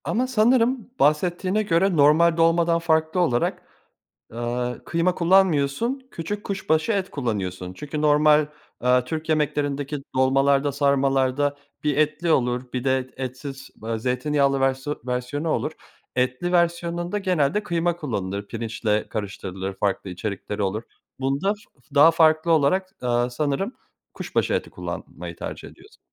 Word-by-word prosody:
Ama 250 +3 0
sanırım 245 0 +2
bahsettiğine 180 +7 +2
göre 185 -1 +2
normal 160 +3 +5
dolmadan 165 0 +3
farklı 160 +1 +1
olarak, 140 -9 +1 0.7
aaa, 120 +1 -2
kıyma 170 +2 +1
kullanmıyorsun, 190 - +2
küçük 205 +5 -5
kuşbaşı 190 -1 0
et 195 -3 -1
kullanıyorsun. 95 -8 -3
Çünkü 150 +9 -5
normal, 150 0 +5 0.3
aaa, 125 0 +3
Türk 160 +4 -5
yemeklerindeki 145 -2 0 0.2
dolmalarda 135 +2 +3
sarmalarda 140 0 +1 0.3
bir 150 -2 +1
etli 155 +3 +1
olur, 125 -3 +1
bir 125 -1 -3
de 130 -1 0
etsiz, 135 +1 -6
eee, 115 0 -2
zeytinyağlı 135 +3 +1
versiyon 135 +2 -1
versiyonu 125 +5 -2
olur. 155 - -1 0.4
Etli 130 +8 0
versiyonunda 170 +2 0
genelde 185 -1 +1
kıyma 170 -2 0
kullanılır, 100 - -4
pirinçle 110 -2 -2
karıştırılır 95 -2 -5
farklı 95 -1 -2
içerikleri 100 +2 -4
olur 100 +3 -1 0.4
bunda 140 +10 0
f 210 - -19 0.3
daha 150 +3 +8
farklı 160 0 +3
olarak, 165 +5 +2
aaa, 120 0 +1
sanırım 150 - -1 0.4
kuşbaşı - - -1
eti - - -2
kullanmayı - - -7
tercih - - -7
ediyorsun. 420 +3 -18
145 Hz, 125 wpm, -24 LUFS, 125-170 Hz, 0.7 s, daha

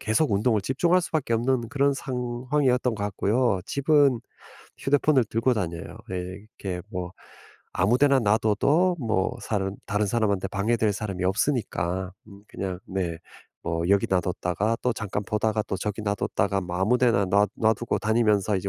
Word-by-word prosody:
계속 110 +2 +1
운동을 110 +2 +2
집중할 170 - +2
수밖에 155 -9 -1
없는 120 0 0
그런 140 +1 +2
상황이었던 125 -1 -1
것 100 - -3
같고요. 105 +1 +1
집은 140 -2 +3 0.6
휴대폰을 145 0 +3
들고 115 +4 +1
다녀요. 85 -5 -4
예 95 - -2 0.5
이렇게 90 -3 -3
뭐 90 -1 -5 0.6
아무 100 +7 +2
데나 140 -2 +5
놔둬도 115 - +2
뭐 110 -4 0
사람 95 -2 -2
다른 105 0 0
사람한테 100 -3 0
방해될 110 +1 +1
사람이 100 -3 -4
없으니까 95 -4 -1 0.2
음 100 -1 -14
그냥 95 -2 -5
네 90 -3 -3 0.5
뭐 85 0 -1
여기 100 0 +4
놔뒀다가 90 +4 0
또 125 - +2
잠깐 100 -1 -3
보다가 110 +1 0
또 95 - -1
저기 105 +2 -4
놔뒀다가 100 -1 0
뭐 90 -1 -5
아무 110 +7 +2
데나 115 -6 +3
놔 100 +2 +3
놔두고 115 +1 +1
다니면서 105 -2 +2
이제 100 +1 -3
110 Hz, 335 characters per minute, -25 LUFS, 95-125 Hz, 0.6 s, 데나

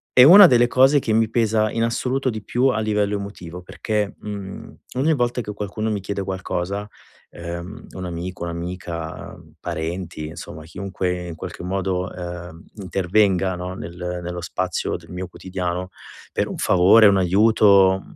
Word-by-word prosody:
è 125 - +8
una 190 +9 +11
delle 120 -6 +5
cose 135 +4 +5
che 115 - -2
mi 110 +1 +3
pesa 110 -2 +1
in 115 - -2
assoluto 130 +3 0
di 110 -3 -5
più 125 +6 +1
a 125 -5 +1
livello 105 -1 0
emotivo, 90 -3 -8
perché, 105 +2 -2
mhmm, 100 -2 -7 0.2
ogni 150 +5 +3
volta 120 -1 0
che 105 -2 -6
qualcuno 105 +2 -3
mi 105 -2 -2
chiede 100 +1 -3
qualcosa, 95 +1 -3 0.4
ehm, 85 +6 -7
un 95 - -5
amico, 90 +1 -5
un'amica, 85 -1 -6 0.2
parenti, 80 -1 -4
insomma 80 -1 -9
chiunque 90 +1 -3
in - - -6
qualche 80 - -8
modo, 95 0 -2
ehm, 85 -2 -8
intervenga 95 0 +1
no, 90 +1 -5
nel 90 0 -6
nello 90 0 -5
spazio 90 +1 -2
del - - -17
mio 90 +1 -5
quotidiano 90 0 -4 0.4
per - - -1
un - - -6
favore, 100 +5 +6
un 100 -1 +4
aiuto, 100 0 +5
mhmm, - - -16
95 Hz, 160 wpm, -22 LUFS, 90-110 Hz, 0.4 s, una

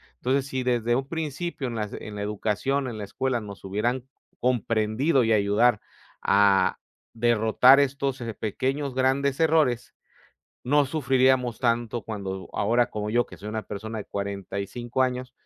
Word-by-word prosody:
Entonces, 130 +2 0
sí 130 -1 -2
desde 120 -1 +1
un 135 +2 -2
principio 160 -1 -4
en 120 - -5
la 105 -2 -2
se - - -9
en 105 - -7
la 100 - -4
educación, 105 +6 -1
en 115 - -5
la - - -4
escuela, 130 +4 -1
nos 100 -4 -10
hubieran 115 +6 -1 0.3
comprendido 120 +3 +1
y 115 -1 +2
ayudar 105 +2 +3 0.4
a 100 -1 +4 0.4
derrotar 120 +3 +5
estos, 140 -1 0
eh, 115 -2 -4
pequeños 130 +7 -2
grandes 130 +2 +1
errores, 155 -7 +2 0.7
no 145 +3 +3
sufriríamos 130 -3 +2
tanto 120 -2 0
cuando 95 -3 -5
ahora 120 +4 +1
como 105 0 -3
yo, 120 +2 +2
que - - -12
soy 105 - -7
una 110 0 -3
persona 110 +2 -6
de 105 - -5
45 100 +5 -3
años, 125 0 -2
120 Hz, 155 wpm, -26 LUFS, 105-130 Hz, 0.7 s, derrotar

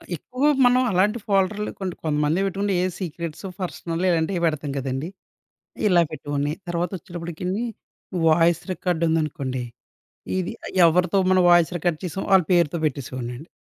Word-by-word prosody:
ఎక్కువ 255 - -6 0.2
మనం 250 +1 +5
అలాంటి 205 +5 +2
ఫోల్డర్లు 200 +1 +1
కొన్ని 185 -3 -3
కొంతమందే 150 +2 +1
పెట్టుకుంటే 195 +1 -1
ఏ - - +2
సీక్రెట్స్, 170 -1 -5 0.2
పర్సనల్ 170 -1 -3
ఇలాంటివి 170 +1 +1
పెడతాం 155 -3 -1
కదండీ! 135 +4 -3 0.8
ఇలా 180 -3 +5
పెట్టుకోని 145 -1 -2 0.2
తర్వాత 175 +1 -1
వచ్చేటప్పటికిని 175 +4 -4 0.6
వాయిస్ 165 +1 +4
రికార్డ్ 175 -2 -1
ఉందనుకోండి, 140 -5 -1 0.8
ఇది 185 +3 -2 0.3
ఎవరితో 180 +3 +3
మనం 185 -1 +5
వాయిస్ 175 0 +5
రికార్డ్ 170 -1 0
చేసామో 180 +2 -4
వాళ్ళ 190 -2 +6
పేరుతో 170 -2 +3
పెట్టేసేవాడినండి. 130 0 -5
170 Hz, 130 wpm, -23 LUFS, 155-185 Hz, 0.8 s, వాళ్ళ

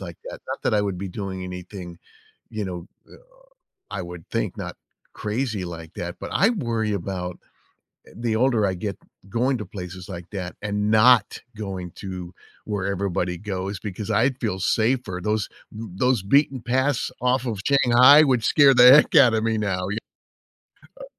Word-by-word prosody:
like 85 -4 -8
that. - - -8
Not - - -5
that - - +1
I 105 - +3
would 95 -3 -3
be 95 0 -4
doing 95 0 -5
anything, 90 -1 -8 0.5
you 105 -2 -4
know, 90 -1 -6 0.2
uh, - - -14 0.7
I - - -4
would 85 -1 -9
think - - -2
not - - -6 0.4
crazy 110 -2 -3
like 85 -1 -8
that, 85 0 -5
but - - -6
I 200 - +4
worry 115 - -1
about, 90 -2 -4 0.7
eh, - - -16
the 115 -1 -1
older 115 -3 +2
I 95 - -1
get, 100 +2 -4 0.3
going 125 +5 +1
to 105 - -5
places 90 -1 -8
like 85 -2 -8
that 90 -3 -5
and 105 0 -1
not 110 +2 +5 0.2
going 95 -4 -5
to 90 -2 -7 0.3
where 105 -3 -3
everybody 90 -2 -2
goes 95 -1 -4
because 105 0 -5
I'd 130 +2 +1
feel 105 -5 -2
safer. 110 -1 0
Those 105 0 0 0.3
n 110 -1 -8
those 125 -2 +2
beaten 135 +3 +2
paths 130 +3 0
off 125 +1 +1
of 110 -5 -3
Shanghai 135 +2 +7
would 125 -6 +2
scare 140 0 +6
the 125 +1 +9
heck 150 - +5
out 130 -6 +7
of 110 - 0
me 110 -1 0
now, 95 -4 -1
y 105 - -3 1.0
Uh - - -7
105 Hz, 175 wpm, -23 LUFS, 95-120 Hz, 1.0 s, the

